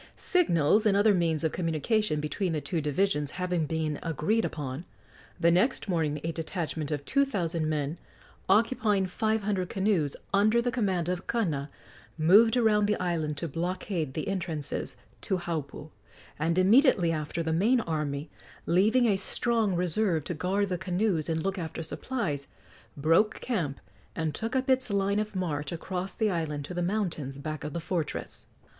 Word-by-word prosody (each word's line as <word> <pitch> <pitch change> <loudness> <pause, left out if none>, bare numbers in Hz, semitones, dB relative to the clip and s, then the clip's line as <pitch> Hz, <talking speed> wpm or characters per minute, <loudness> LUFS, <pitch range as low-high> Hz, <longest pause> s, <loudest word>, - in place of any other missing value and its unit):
Signals 215 - +3
and 200 -1 +3
other 205 +1 +5
means 165 -4 +1
of 160 - +1
communication 170 +2 0
between 165 +4 -2
the 155 - 0
two 165 +2 -2
divisions 150 0 0
having 180 -4 0
been 155 -2 -2
agreed 165 +8 0
upon, 140 0 -4 0.6
the 170 0 +4
next 225 +8 +2
morning 160 -5 0
a 165 - -1
detachment 160 -2 -3
of 145 -2 -3
two 280 0 +3
thousand 170 - -1
men, 150 +1 -2 0.5
occupying 210 -1 +3
five 220 +3 -1
hundred 195 -3 -1
canoes, 190 -8 +1 0.2
under 215 +4 +4
the 245 +1 0
command 190 -8 0
of 180 0 -3
Kana, 160 -12 -1 0.5
moved 205 +9 +6
around 210 -3 +3
the 210 - 0
island 160 -4 -1
to 165 - -2
blockade 170 -2 -3
the 155 - -3
entrances 165 -7 -3 0.2
to 190 - 0
Haupu, 155 -3 -5 0.5
and 165 +3 +1
immediately 195 - +5
after 155 +1 -2
the 160 0 -1
main 220 +10 +3
army, 150 -5 -3 0.3
leaving 215 +8 +4
a 205 -4 +3
strong 220 0 0
reserve 175 -1 +1
to 175 - -3
guard 190 +5 0
the 180 -2 -2
canoes 180 -3 0
and 160 -1 -1
look 195 0 -1
after 165 -1 -5
supplies, 155 - -3 0.5
broke 165 +9 +3
camp 165 - -2 0.4
and 160 -2 -1
took 225 - -3
up 260 +1 +1
its 260 -1 +2
line 200 0 +1
of 215 -1 -3
march 150 -6 -2
across 180 +2 -4
the 215 -2 +1
island 150 -4 -2
to 180 - -7
the 175 - -2
mountains 175 -8 -2
back 155 +2 -5
of 150 -1 -5
the 170 - -2
fortress. 170 -1 -4
175 Hz, 165 wpm, -28 LUFS, 155-205 Hz, 0.6 s, moved